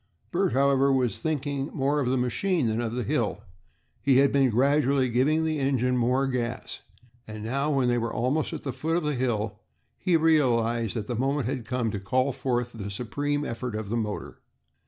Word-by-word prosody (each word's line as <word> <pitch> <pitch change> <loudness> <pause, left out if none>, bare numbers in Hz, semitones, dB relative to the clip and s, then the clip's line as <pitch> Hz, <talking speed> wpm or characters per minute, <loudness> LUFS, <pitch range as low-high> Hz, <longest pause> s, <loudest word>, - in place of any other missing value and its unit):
Bert, - - +1
however, 140 +1 +3
was 130 -3 +1
thinking 145 -3 -2
more 140 +1 +1
of 130 -3 0
the 130 - +1
machine 150 +6 0
than 110 +1 0
of 115 -1 -3
the 125 0 -2
hill. - - -1 0.6
He 135 -2 +4
had 140 0 +5
been 135 -2 +3
gradually 135 +2 +2
giving 145 +7 +2
the 155 -1 -1
engine 130 -2 +1
more 125 +3 +2
gas, 125 -1 -3 0.5
and 110 -1 -7
now, 135 +6 -1
when 135 -4 +2
they 120 0 +2
were 115 0 -2
almost 130 +7 0
at 160 - -6
the 135 - -3
foot 165 +5 -1
of 175 - -1
the 150 0 0
hill, 110 -5 -1 0.4
he 180 -3 +3
realized 120 -8 +2
that 110 -3 -2
the 120 - -3
moment 135 +2 0
had 125 -2 -3
come 120 -3 -1
to 100 - -3
call 130 +7 +1
forth 125 -2 -2
the 100 -3 -6
supreme 145 +8 -2
effort 115 0 -4
of 110 -2 -4
the 115 - -1
motor. 105 -3 -4
130 Hz, 200 wpm, -26 LUFS, 115-140 Hz, 0.6 s, had